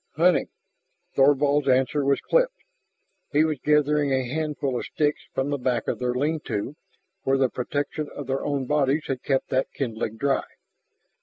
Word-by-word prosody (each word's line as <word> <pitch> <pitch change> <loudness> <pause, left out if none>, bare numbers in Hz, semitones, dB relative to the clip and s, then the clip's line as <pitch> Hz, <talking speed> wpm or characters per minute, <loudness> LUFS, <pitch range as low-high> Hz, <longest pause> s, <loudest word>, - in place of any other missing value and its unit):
"Hunting." 170 +2 +3 0.7
Thorvald's 145 +1 +4
answer 130 +2 +2
was 140 0 +2
clipped. - - +2 0.8
He 150 +1 +4
was 155 -4 -1
gathering 150 -1 +2
a 130 -2 +1
handful 145 -2 -2
of - - -5
sticks 150 -1 0
from 135 +2 0
the 145 - -1
back 125 -2 -1
of - - -1
their 125 0 -1
lean 150 +5 0
to, 105 +8 -3 0.5
where 135 -4 +2
the 135 -1 +3
protection 145 +5 -3
of 145 - -5
their 135 +1 -2
own 140 -2 -1
bodies 145 +2 +1
had 130 -2 -3
kept 135 -2 0
that 130 0 0
kindling 115 -4 -3
dry. 140 +2 +1
140 Hz, 165 wpm, -25 LUFS, 130-150 Hz, 0.8 s, Thorvald's